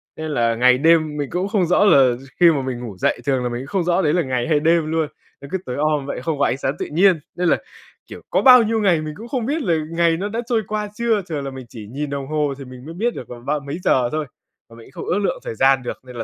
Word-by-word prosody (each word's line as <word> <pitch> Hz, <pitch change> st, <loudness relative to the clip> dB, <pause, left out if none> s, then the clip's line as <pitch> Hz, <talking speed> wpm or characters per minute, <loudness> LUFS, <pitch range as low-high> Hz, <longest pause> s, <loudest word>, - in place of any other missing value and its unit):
nên 155 Hz, 0 st, -5 dB
là 115 Hz, -4 st, +1 dB
ngày 125 Hz, +2 st, +4 dB
đêm 155 Hz, 0 st, +3 dB
mình 145 Hz, -2 st, -3 dB
cũng 180 Hz, +2 st, -1 dB
không 200 Hz, -3 st, +1 dB
rõ 180 Hz, +4 st, +3 dB
là 135 Hz, -10 st, +5 dB
gi 130 Hz, +3 st, -13 dB
khi 175 Hz, -1 st, +7 dB
mà 145 Hz, -4 st, 0 dB
mình 130 Hz, -2 st, -4 dB
ngủ 115 Hz, -6 st, -8 dB
dậy, -, -, 0 dB
thường 130 Hz, -3 st, +1 dB
là 125 Hz, -, -1 dB
mình 120 Hz, 0 st, -4 dB
cũng 135 Hz, -, -9 dB
không 185 Hz, +4 st, -1 dB
rõ 175 Hz, +2 st, +1 dB
đấy 150 Hz, -4 st, +1 dB
là 175 Hz, -, +2 dB
ngày 130 Hz, -1 st, -2 dB
hay 155 Hz, -3 st, +3 dB
đêm 160 Hz, 0 st, +2 dB
luôn. 160 Hz, -1 st, 0 dB, 0.3 s
Nó 140 Hz, -, -9 dB
cứ 190 Hz, -, 0 dB
tối 125 Hz, -, -4 dB
om 150 Hz, -1 st, 0 dB
vậy, 140 Hz, -, -5 dB
không 155 Hz, -1 st, -2 dB
có 140 Hz, -, +3 dB
ánh -, -, 0 dB
sáng 135 Hz, +1 st, -2 dB
tự -, -, -2 dB
nhiên 180 Hz, +2 st, +4 dB, 0.2 s
nên 175 Hz, -1 st, +1 dB
là, -, -, +3 dB, 0.5 s
kiểu, -, -, -10 dB
có -, -, +2 dB
bao 250 Hz, -2 st, +8 dB
nhiêu 225 Hz, 0 st, 0 dB
ngày 180 Hz, -6 st, +3 dB
mình 155 Hz, 0 st, -5 dB
cũng 230 Hz, -, -9 dB
không 240 Hz, -2 st, -2 dB
biết 300 Hz, +6 st, -1 dB
là 175 Hz, -, +1 dB, 0.2 s
ngày 165 Hz, -1 st, +2 dB
nó 200 Hz, +4 st, -3 dB
đã 225 Hz, +2 st, -3 dB
trôi 230 Hz, -2 st, +2 dB
qua 210 Hz, -1 st, -3 dB
chưa. 230 Hz, -2 st, +1 dB
Thường 145 Hz, -4 st, -3 dB
là 135 Hz, -, -4 dB
mình 130 Hz, -1 st, -9 dB
chỉ 110 Hz, -3 st, -10 dB
nhìn 140 Hz, +6 st, -5 dB
đồng 140 Hz, -1 st, -4 dB
hồ 150 Hz, -1 st, 0 dB
thì 140 Hz, -, -9 dB
mình 125 Hz, 0 st, -12 dB
mới 160 Hz, -, -8 dB
biết 230 Hz, +7 st, -1 dB
được 125 Hz, -, -8 dB
là 120 Hz, -, -8 dB
ba 145 Hz, +5 st, -2 dB
mấy 140 Hz, +4 st, -6 dB
giờ 125 Hz, -2 st, +2 dB
thôi, 155 Hz, 0 st, -2 dB, 0.4 s
mà 115 Hz, -, -15 dB
mình 115 Hz, -1 st, -14 dB
cũng -, -, -7 dB
không -, -, -1 dB
ước 200 Hz, -, +1 dB
lượng 200 Hz, -, -1 dB
thời -, -, -5 dB
gian 135 Hz, +2 st, +3 dB
được 120 Hz, -, -5 dB
nên 125 Hz, -1 st, -12 dB
là 115 Hz, -, -3 dB
150 Hz, 310 wpm, -20 LUFS, 130-180 Hz, 0.5 s, bao